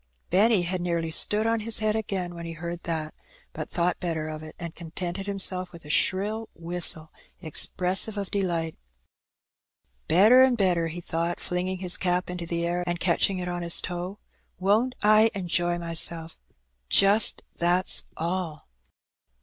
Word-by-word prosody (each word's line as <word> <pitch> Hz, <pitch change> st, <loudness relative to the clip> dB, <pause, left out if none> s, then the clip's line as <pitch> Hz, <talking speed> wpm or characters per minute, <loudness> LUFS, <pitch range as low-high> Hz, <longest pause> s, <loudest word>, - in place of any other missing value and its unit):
Benny 200 Hz, +1 st, +4 dB
had 180 Hz, +1 st, -2 dB
nearly 170 Hz, -2 st, -2 dB
stood 210 Hz, +6 st, +2 dB
on 225 Hz, 0 st, +1 dB
his 220 Hz, +1 st, -3 dB
head 215 Hz, 0 st, 0 dB
again 190 Hz, -5 st, -3 dB
when 170 Hz, 0 st, -8 dB
he 165 Hz, -, -6 dB
heard 170 Hz, +1 st, -6 dB
that; 160 Hz, -2 st, -3 dB, 0.4 s
but -, -, -6 dB
thought 175 Hz, 0 st, -1 dB
better 160 Hz, -3 st, -3 dB
of 155 Hz, 0 st, -6 dB
it, 155 Hz, 0 st, -10 dB
and 170 Hz, -2 st, -7 dB
contented 175 Hz, +3 st, -5 dB
himself 185 Hz, -2 st, +1 dB
with 170 Hz, -3 st, -13 dB
a 150 Hz, -, -4 dB
shrill 210 Hz, +7 st, 0 dB
whistle 165 Hz, -2 st, +1 dB, 0.3 s
expressive 185 Hz, +5 st, +1 dB
of 200 Hz, -2 st, -4 dB
delight. 170 Hz, -5 st, -1 dB, 1.3 s
"Better 210 Hz, +10 st, +6 dB
an' 260 Hz, -1 st, +5 dB
better," 180 Hz, -6 st, +1 dB
he 170 Hz, +2 st, -6 dB
thought, 170 Hz, +1 st, -3 dB
flinging 180 Hz, +1 st, -2 dB
his 180 Hz, -1 st, -2 dB
cap 180 Hz, 0 st, -1 dB
into 175 Hz, -1 st, -6 dB
the 170 Hz, 0 st, -1 dB
air 175 Hz, +1 st, -1 dB
and 175 Hz, 0 st, -2 dB
catching 185 Hz, +2 st, +2 dB
it 180 Hz, -1 st, -4 dB
on 175 Hz, 0 st, -3 dB
his 170 Hz, 0 st, +2 dB
toe; 180 Hz, +3 st, -5 dB
^' -, -, -46 dB, 0.3 s
won't 215 Hz, +7 st, +2 dB
I 215 Hz, +1 st, +6 dB
enjoy 175 Hz, -2 st, 0 dB
myself, 165 Hz, -1 st, -1 dB, 0.5 s
just, 200 Hz, +2 st, +5 dB
that's 175 Hz, +2 st, +2 dB
all?" 170 Hz, -2 st, -3 dB
180 Hz, 160 wpm, -26 LUFS, 170-195 Hz, 1.3 s, Better